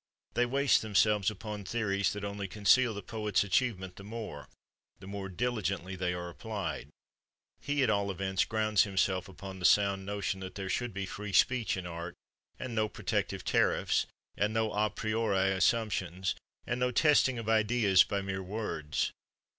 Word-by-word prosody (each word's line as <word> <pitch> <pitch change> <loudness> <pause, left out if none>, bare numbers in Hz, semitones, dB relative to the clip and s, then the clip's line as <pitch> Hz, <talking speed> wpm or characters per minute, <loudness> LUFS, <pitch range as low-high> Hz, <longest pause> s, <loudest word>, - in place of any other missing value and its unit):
They 120 0 +2
waste 140 +2 +3
themselves 105 -1 +3
upon 105 0 -6
theories 100 -2 0
that 105 0 -6
only 100 -1 -4
conceal 110 +4 +3
the 100 - -6
poet's 105 -4 0
achievement 95 -2 0
the 100 - -10
more, 105 -8 -7 0.5
the 95 - -12
more 100 0 -5
diligently 100 -3 -2
they 90 -1 -1
are 90 0 -4
applied; 90 -5 -5 0.7
he, 145 -1 0
at 125 - +2
all 100 -1 +1
events, 95 0 0
grounds 110 -2 +2
himself 95 -2 0
upon 95 0 -9
the - - -8
sound 100 0 +4
notion 100 -1 -2
that 95 -1 -7
there 95 -1 -4
should 120 -1 -1
be 95 0 -4
free 100 +1 -6
speech 120 -4 +3
in 90 - -5
art, 85 0 -6 0.4
and 130 -2 -5
no 110 -1 +1
protective - - -2
tariffs, - - +2 0.3
and 105 +2 0
no 110 -1 +1
a 105 +1 +2
priori 110 -4 0
assumptions, 95 -3 +1 0.3
and 120 +1 -2
no 125 0 +2
testing 130 -1 +4
of 115 -2 -5
ideas 110 -3 +4
by 100 -1 -2
mere 95 0 -3
words. 95 -7 -2
100 Hz, 165 wpm, -31 LUFS, 95-110 Hz, 0.7 s, sound